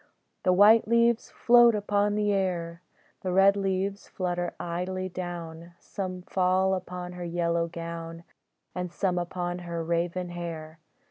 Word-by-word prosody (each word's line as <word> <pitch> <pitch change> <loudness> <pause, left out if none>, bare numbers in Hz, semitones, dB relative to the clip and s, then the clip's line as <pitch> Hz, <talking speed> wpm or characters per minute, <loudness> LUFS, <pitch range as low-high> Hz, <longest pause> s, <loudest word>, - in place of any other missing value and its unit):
The 185 - +3
white 210 +5 +6
leaves 235 0 +3
float 240 -1 +5
upon 205 0 +1
the 210 -1 +1
air, 175 -3 -2 0.4
The 185 - -2
red 195 +2 +5
leaves 195 0 -2
flutter 175 -1 -3
idly 185 +2 -3
down, 170 -2 -7
Some 185 -2 -6
fall 185 +1 +2
upon 180 -1 -5
her 180 0 -7
yellow 170 -1 0
gown, 165 0 -7 0.5
And 180 -1 -4
some 180 0 0
upon 175 0 -3
her 170 -1 -4
raven 170 +2 -1
hair. 165 -2 -7
180 Hz, 135 wpm, -27 LUFS, 170-195 Hz, 0.5 s, white